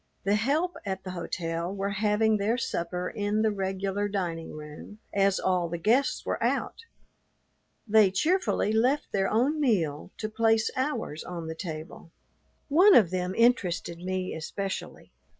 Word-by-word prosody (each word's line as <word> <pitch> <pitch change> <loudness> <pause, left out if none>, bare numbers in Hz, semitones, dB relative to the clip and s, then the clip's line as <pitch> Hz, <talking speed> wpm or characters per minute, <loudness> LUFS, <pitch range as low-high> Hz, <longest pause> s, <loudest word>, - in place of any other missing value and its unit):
The 200 - +2
help 290 +12 +1
at 190 -1 -4
the 185 - -6
hotel 170 -1 -3
were 200 0 -2
having 210 +1 +2
their 210 +4 0
supper 180 -5 -2
in 210 +2 -1
the 220 - +3
regular 195 +1 -2
dining 175 -5 -3
room, 150 +7 -10 0.2
as 195 -1 +2
all 180 -2 +1
the 170 - -3
guests 235 +10 +1
were - - -2
out. 460 - -1 1.0
They 215 -2 +6
cheerfully 320 - +1
left 255 +6 +1
their 195 -1 +1
own 265 +8 +2
meal 170 - 0
to 215 - -3
place 225 0 +2
ours 260 - -2
on 170 -2 -6
the 160 - -4
table. 160 -1 -7 0.6
One 365 +7 +6
of 190 -7 +6
them 185 0 -2
interested 185 -8 +1
me 185 +1 -3
especially. 195 +5 -5
200 Hz, 150 wpm, -28 LUFS, 180-220 Hz, 1.0 s, They